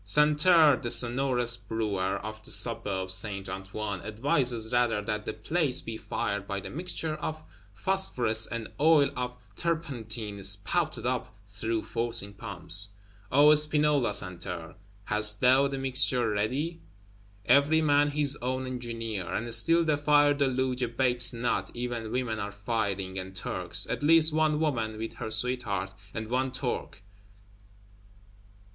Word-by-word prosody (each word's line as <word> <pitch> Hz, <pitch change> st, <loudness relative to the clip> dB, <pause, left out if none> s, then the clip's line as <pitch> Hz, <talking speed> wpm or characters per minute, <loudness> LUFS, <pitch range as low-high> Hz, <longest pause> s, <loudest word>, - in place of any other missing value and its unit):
Santerre, 150 Hz, -, +4 dB
the 120 Hz, -, -6 dB
sonorous 125 Hz, -1 st, +3 dB
Brewer 100 Hz, -5 st, -3 dB
of 110 Hz, 0 st, -9 dB
the -, -, -4 dB
Suburb 100 Hz, -5 st, +1 dB
Saint 100 Hz, 0 st, 0 dB
Antoine, 95 Hz, +1 st, -6 dB
advises 120 Hz, -1 st, 0 dB
rather 120 Hz, -3 st, +1 dB
that 105 Hz, 0 st, -4 dB
the -, -, -3 dB
place 145 Hz, +4 st, 0 dB
be 115 Hz, -, -7 dB
fired 100 Hz, -3 st, -5 dB
by 100 Hz, -, -4 dB
a 100 Hz, -, -7 dB
"mixture 165 Hz, -1 st, -3 dB
of 155 Hz, +1 st, -6 dB, 0.3 s
phosphorus 120 Hz, -, +3 dB
and 115 Hz, -2 st, -6 dB
oil 150 Hz, -1 st, +3 dB
of 125 Hz, 0 st, -5 dB, 0.2 s
turpentine 115 Hz, -11 st, -4 dB
spouted 100 Hz, -, -1 dB
up 125 Hz, 0 st, -2 dB, 0.2 s
through 110 Hz, +2 st, -4 dB
forcing 115 Hz, -4 st, 0 dB
pumps." 95 Hz, 0 st, 0 dB, 0.4 s
O 145 Hz, +3 st, +5 dB
Spinola 150 Hz, -5 st, +2 dB
Santerre, 90 Hz, -4 st, -3 dB, 0.3 s
hast 105 Hz, 0 st, +4 dB
thou 130 Hz, +2 st, +3 dB
the 140 Hz, 0 st, -5 dB
mixture 130 Hz, -3 st, +3 dB
ready? 135 Hz, +11 st, -3 dB, 0.6 s
Every 145 Hz, +5 st, +3 dB
man 145 Hz, -1 st, +2 dB
his 145 Hz, -1 st, +2 dB
own 130 Hz, +1 st, -3 dB
engineer! 115 Hz, -6 st, -5 dB
And 115 Hz, +1 st, -2 dB
still 165 Hz, +9 st, +5 dB
the 155 Hz, -2 st, 0 dB
fire 145 Hz, 0 st, +3 dB
deluge 130 Hz, -2 st, -2 dB
abates 120 Hz, 0 st, +6 dB
not; 120 Hz, 0 st, -3 dB
even 120 Hz, -2 st, -5 dB
women 125 Hz, -4 st, -3 dB
are 100 Hz, -1 st, -5 dB
firing, 100 Hz, -3 st, -4 dB
and 95 Hz, 0 st, -9 dB
Turks; 90 Hz, 0 st, -4 dB
at -, -, -4 dB
least 160 Hz, +1 st, +4 dB
one 155 Hz, -1 st, 0 dB
woman 115 Hz, -9 st, -2 dB
(with 110 Hz, +1 st, -6 dB
her 110 Hz, -, -6 dB
sweetheart), 110 Hz, -5 st, 0 dB, 0.2 s
and 110 Hz, +1 st, -6 dB
one 130 Hz, +2 st, -2 dB
Turk. 125 Hz, -5 st, -5 dB
120 Hz, 140 wpm, -27 LUFS, 105-145 Hz, 0.6 s, abates